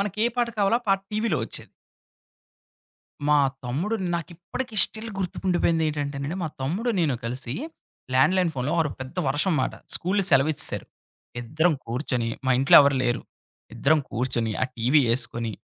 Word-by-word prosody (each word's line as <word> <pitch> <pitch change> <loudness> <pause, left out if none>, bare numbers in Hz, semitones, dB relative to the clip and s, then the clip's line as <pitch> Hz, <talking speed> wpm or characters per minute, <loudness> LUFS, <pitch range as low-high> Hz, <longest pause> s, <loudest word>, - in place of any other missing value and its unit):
మనకే 210 +3 0
పాట 240 -1 +1
కావాలో 205 +4 +3
ఆ - - -27
పాట 195 0 +3
టీవీలో 215 -6 0
వచ్చేది. - - -7 1.6
మా 150 0 +5 0.3
తమ్ముడు 160 - -1 0.2
నాకు 170 +1 -3
ఇప్పటికి 220 +7 -6
స్టిల్ 225 +1 -8
గుర్తుండిపోయిందేంటంటే 160 -5 -1
మా 160 - -1
తమ్ముడు, 200 - -1
నేను 150 -6 +1
కలిసి 125 +1 -4 0.6
ల్యాండ్‌లైన్ 170 +7 +4
ఫోనులో 135 +5 -1
ఆ - - +5
రోజు 140 - -6
పెద్ద 130 +7 -11
వర్షం 150 +7 +1
అన్నమాట, 130 -4 0 0.2
స్కూళ్ళు 190 +3 0
సెలవిచ్చేశారు. 140 +2 +2 0.5
ఇద్దరం 160 +8 +1
కూర్చొని 120 -1 -2 0.2
మా - - +3
ఇంట్లో 135 - +7
ఎవరు 140 -1 +3
లేరు 120 -1 0 0.5
ఇద్దరం 150 +6 +3
కూర్చొని 120 -2 -1
ఆ - - +5
టీవీ 125 +6 +4
ఏసుకొని, 115 -2 -2
150 Hz, 140 wpm, -25 LUFS, 130-185 Hz, 1.6 s, ఇంట్లో